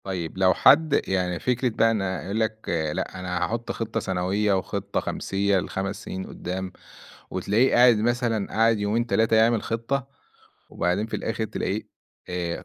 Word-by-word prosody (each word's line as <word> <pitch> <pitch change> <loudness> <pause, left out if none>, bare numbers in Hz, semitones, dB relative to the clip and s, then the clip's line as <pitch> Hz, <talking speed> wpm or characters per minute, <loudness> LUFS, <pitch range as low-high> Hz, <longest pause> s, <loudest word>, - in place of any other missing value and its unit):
طيب 90 -3 -4
لو 95 -1 +4
حد 155 - +5
يعني 90 -2 0
فكرة 125 0 0
بقى 115 0 +2
أنا 95 -4 -2
يقول 100 +4 -2
لك 110 0 -2 0.3
لا 95 - -4
أنا 90 -1 -3
هاحُط 115 +4 -3
خِطّة 115 0 -3
سنوية 95 +2 0
وخِطّة 100 +1 -2
خَمسية 100 0 0
ل5 95 +2 -4
سنين 95 0 -5
قُدّام، 95 +1 -5 0.6
وتلاقيه 115 +6 +2
قاعد 120 -2 +6
مثلًا 115 -2 0
قاعد 115 0 +2
يومين، 110 +4 0
3 115 -1 +2
يعمل 115 0 +3
خِطّة 120 +4 -2 0.6
وبعدين 90 +5 0
في 115 - -3
الآخِر 110 0 -2
تلاقيه 105 -1 -3 0.5
آآ، 90 -1 -3
105 Hz, 150 wpm, -25 LUFS, 95-115 Hz, 0.6 s, قاعد